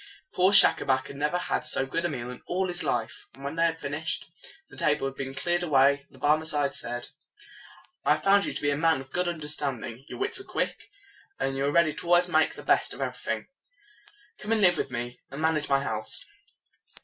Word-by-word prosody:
Poor 185 +2 +4
Schacabac 130 -9 +5
had - - -9
never 150 +5 0
had 180 - -2
so 150 -3 +2
good 165 +5 -2
a - - +1
meal 125 -4 -5
in 125 - -10
all 185 +1 0
his 175 0 0
life. 110 - -2
When 140 +3 -5
they 165 0 +3
had 165 -1 0
fin 140 - -5
ished, 160 +2 -2 0.4
and - - -12
the - - -4
table 150 -2 +2
had 135 - -3
been 135 0 -5
cleared 175 +5 0
away, 140 -3 +3
the - - -18
Barmecide 150 -1 +1
said, 120 +1 -5 0.9
"I 150 - +4
have 155 - -8
found 200 0 +4
you - - -3
to - - -4
be 145 - +2
a - - +1
man 160 0 +2
of 130 0 -14
good 180 0 0
un 175 -1 -2
der 150 -1 -6
stand 140 -6 -2
ing. 120 +3 -9
Your - - -7
wits 395 0 -1
are - - -9
quick, - - -3 0.5
and 135 - -1
you 135 +1 0
are 140 - +1
ready 155 -1 +3
always 175 +1 +4
to 180 - -9
make 155 -1 +3
the - - -9
best - - +2
of - - -8
everything. - - -3 0.9
Come 215 +2 -1
and 220 - +1
live 175 -4 +5
with - - -2
me, 120 0 -5
and 140 - -8
manage 160 -1 0
my 140 0 +2
house." 110 - -1
150 Hz, 235 wpm, -27 LUFS, 135-175 Hz, 0.9 s, Schacabac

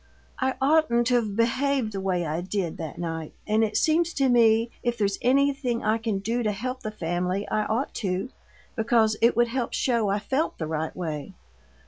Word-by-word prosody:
I 260 0 0
oughtn't 270 -4 +3
to've 235 -4 +1
behaved 245 +1 +1
the 195 -2 -4
way 180 -3 0
I 160 +2 -2
did 185 -2 -3
that 160 -3 -6
night, 165 -2 -5
and 215 +1 +2
it 215 -1 0
seems 335 +2 +2
to 270 -2 +2
me 230 -1 +4
if 240 -1 -1
there's 200 -2 0
anything 270 -2 +1
I 215 +1 +1
can 220 -3 -1
do 225 +5 -1
to 215 -2 +1
help 250 +6 -4
the 215 - -4
family, 180 0 -2
I 215 0 0
ought 235 +6 -1
to, 190 +5 -2 0.4
because 225 -2 +2
it 235 +1 +4
would 240 0 +3
help 245 -1 -2
show 235 -5 +1
I 200 - +1
felt 270 +9 -1
the 160 - -3
right 155 0 -3
way. 160 0 -5
220 Hz, 190 wpm, -26 LUFS, 195-245 Hz, 0.4 s, me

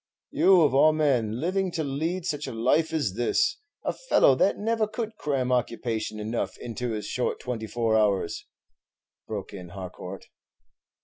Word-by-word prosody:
"You 190 -2 +5
of 145 -4 +4
all 155 +3 +6
men 125 -8 +1
living 185 +5 0
to 160 - -1
lead 160 +6 -2
such 150 -5 -2
a - - -4
life 130 +8 +2
as 145 - 0
this! 410 - +1 0.3
a - - 0
fellow - - +4
that 160 +9 +2
never 220 +1 0
could 220 +1 -4
cram 135 -8 -1
occupation 115 -3 -1
enough 110 +3 -3
into 120 0 -4
his 105 -1 -4
short 125 - -2
twenty 115 -3 -4
four 115 +1 0
hours," 100 -5 +1 0.8
broke 105 -3 -5
in 90 -3 -8
Harcourt. 90 0 -8
125 Hz, 160 wpm, -26 LUFS, 110-165 Hz, 0.8 s, all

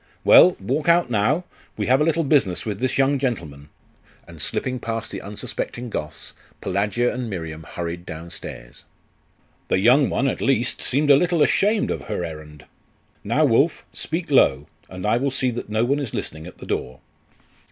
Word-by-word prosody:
Well, 180 - +7
walk 140 - -1
out 170 -6 +3
now; 125 - +1 0.3
we 105 - -1
have 130 +3 +3
a - - +5
little 165 +1 +1
business 135 - +1
with 105 -3 -3
this 130 0 -1
young 140 0 +2
gentleman.' 75 - -4 0.6
And - - -11
slipping 125 -1 -2
past 115 -1 -4
the 95 - -6
unsuspecting 110 +3 -5
Goths, 75 -5 -6 0.3
Pelagia 105 +5 0
and 125 -2 -4
Miriam 80 -5 -6
hurried 85 +1 -6
downstairs. 80 -7 -9 0.8
'The - - +2
young 125 +8 +4
one, 135 - 0
at 130 - -2
least, 125 -2 0
seems 145 +3 +2
a - - +9
little 170 +1 +3
ashamed 210 +3 +2
of - - -4
her 100 -5 -3
errand.... 75 -2 -10 0.6
Now, 140 +9 +2
Wulf, 140 +6 +2
speak 165 -1 -4
low; 70 - +4 0.2
and 90 +1 -7
I 110 +2 +3
will 140 +3 0
see 130 -1 -1
that 120 -2 -6
no 110 +2 +1
one 140 +4 +1
is 135 -7 -4
listening 80 +2 -6
at 90 - -12
the - - -10
door. 65 0 -4
120 Hz, 175 wpm, -22 LUFS, 90-140 Hz, 0.8 s, a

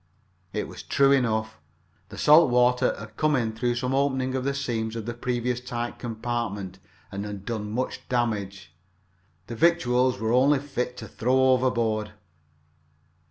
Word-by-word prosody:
It - - -3
was - - -9
true 140 0 +3
enough. 110 -8 +1 0.5
The - - -10
salt 155 0 +6
water 125 0 +3
had 110 +1 -11
come 155 -1 +2
in 115 -4 0
through 120 +2 -1
some 125 +1 -2
opening 130 -1 0
of 130 -1 -1
the 140 +1 -1
seams 115 -5 -2
of 115 -2 -5
the 120 - -3
previously 125 0 -2
tight 120 -1 -4
compartment 110 -5 -4 0.3
and 100 +1 -4
had 100 -2 -7
done 110 -3 -4
much 125 +4 -4
damage. 100 -8 -2 0.7
The 115 - -7
victuals 125 -5 +2
were 110 +1 0
only 135 +4 +4
fit 125 -3 -4
to 110 - -7
throw 130 +4 +2
overboard. 115 -5 0
120 Hz, 155 wpm, -26 LUFS, 110-130 Hz, 0.7 s, salt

